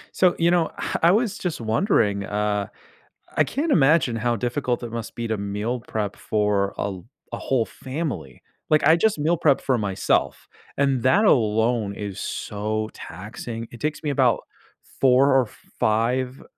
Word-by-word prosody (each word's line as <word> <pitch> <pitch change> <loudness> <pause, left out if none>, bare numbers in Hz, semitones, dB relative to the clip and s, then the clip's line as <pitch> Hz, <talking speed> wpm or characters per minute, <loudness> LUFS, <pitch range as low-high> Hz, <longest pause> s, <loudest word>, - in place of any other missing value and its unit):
So, 180 -1 +4
you 170 0 +4
know, 175 -2 +2
ah, - - -3
I 170 - +7
was 215 +1 +1
just 180 -4 -3
wondering, 110 - +1
uh, 105 0 -1 0.7
I - - +5
can't 295 +3 -1
imagine 145 -4 +4
how 120 +1 0
difficult 125 +1 -2
it 115 - -7
must 115 -1 -6
be 120 - -3
to 110 -1 -1
meal 105 +5 -3
prep 105 -3 -3
for 105 -2 0
a - - -1
l 90 - -11 0.3
a - - -3
whole 125 -4 0
family, 130 - -5 0.3
like, 155 -1 +4
I 160 - +7
just 215 0 +1
meal 160 +4 +2
prep 145 -4 +3
for 130 - +1
myself, 100 -3 0 0.3
and 135 -3 +2
that 195 +12 +4
alone 110 - +2
is 100 -2 -6
so 110 +1 -3
taxing. 115 +3 -7
It 120 - -11
takes 150 +1 -2
me 150 - -1
about 140 - +3 0.6
4 135 +1 +5
or 130 -2 +4 0.3
5, 125 +4 0
120 Hz, 165 wpm, -23 LUFS, 105-145 Hz, 0.7 s, I